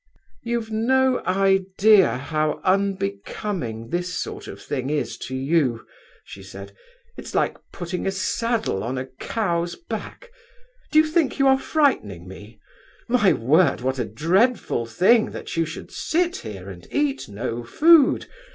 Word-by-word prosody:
'You've 235 -2 -3
no 260 +4 +2
idea 195 -1 +4
how 155 +2 -1
unbecoming 195 - -2
this 175 +3 -2
sort - - -6
of - - -9
thing 130 -1 -4
is 150 -1 -2
to 130 - -6
you,' 135 -3 0 0.4
she - - -11
said, - - -11 0.4
'it's - - -8
like - - +1 0.2
putting 180 +1 -4
a - - +1
saddle 220 - -1
on 125 +3 -3
a 130 - -3
cow's 170 - -2
back. 470 +7 -8 0.6
Do 310 - +2
you 310 - +7
think 310 -2 +1
you 275 - +3
are 265 0 +5
frightening 105 - 0
me? 105 +3 -12 0.5
My 235 -6 +4
word, 150 +6 +3
what 130 +1 -1
a 120 - 0
dreadful 165 - +1
thing 195 - +3
that - - -7
you 165 -1 +1
should 165 - -8
sit 350 +2 0
here 100 -4 -8
and 90 -3 -10
eat 290 - -1
no 115 +3 -4
food! 305 - +5
185 Hz, 145 wpm, -23 LUFS, -, 0.6 s, you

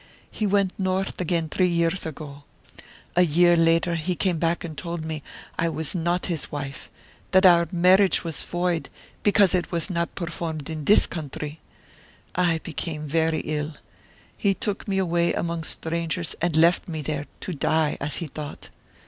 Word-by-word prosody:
He 215 - -1
went 200 -1 +2
north 190 0 -1
again 170 -2 0
three 180 +4 +2
years 170 0 0
ago. 145 -2 -8 0.7
A 180 - +5
year 175 +1 +5
later 165 +1 +3
he 170 +2 -1
came 175 -2 0
back 170 +1 0
and 160 -3 -6
told 170 0 -5
me 160 -1 -4 0.4
I 170 - +2
was 160 -2 -1
not 175 0 0
his 165 -5 -3
wife, 140 -2 -6 0.4
that 190 +1 +5
our 170 -2 +6
marriage 185 +2 +4
was 165 -3 -2
void 175 -2 -1 0.3
because 205 -2 +4
it 180 -1 0
was 170 +2 -1
not 170 -1 -2
performed 165 -4 -4
in 155 -2 -5
this 210 - +7
country. 150 -1 -6 0.7
I 175 -2 +2
became 155 -2 -4
very 160 +1 +1
ill. 150 0 -3 0.6
He 200 -1 +2
took 205 +2 -3
me 195 -1 0
away 170 -2 +1
among 170 -1 -2
strangers 165 +1 -2
and 170 -2 +1
left 170 +4 +4
me 160 -3 -4
there, 145 0 -3
to 185 - -4
die, 155 +1 +1
as 140 +2 -1
he 170 - -1
thought. 150 0 -8
170 Hz, 165 wpm, -25 LUFS, 155-180 Hz, 0.7 s, this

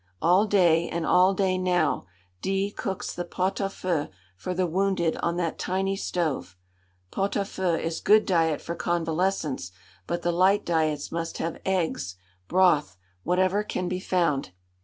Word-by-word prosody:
All 180 +6 +4
day, 170 -5 +3
and 170 -1 -2
all 185 +2 +4
day 185 -2 +1
now, 180 - +1 0.4
D 195 +1 0
cooks 195 -2 -4
the 175 - -3
pot 185 +2 -2
à 195 - -1
feu 175 -6 -2 0.3
for 180 - -4
the 185 0 +1
wounded 180 -1 +1
on 170 0 -1
that 170 -2 -2
tiny 195 +1 -1
stove. 155 - -2 0.5
Pot 195 +1 -1
à 200 - 0
feu 185 -3 -1
is 165 0 -3
good 215 +1 +5
diet 165 -5 +1
for 170 - -4
convalescents, 165 - -1 0.4
but 170 0 -2
the 175 - +2
"light 190 +4 +3
diets" 155 -3 0
must 165 0 -3
have 165 0 -4
eggs, 165 - -1 0.3
broth, 160 - +3 0.3
whatever 185 +3 +2
can 185 -3 -3
be 180 +1 -2
found. 165 - 0
180 Hz, 160 wpm, -26 LUFS, 165-190 Hz, 0.5 s, good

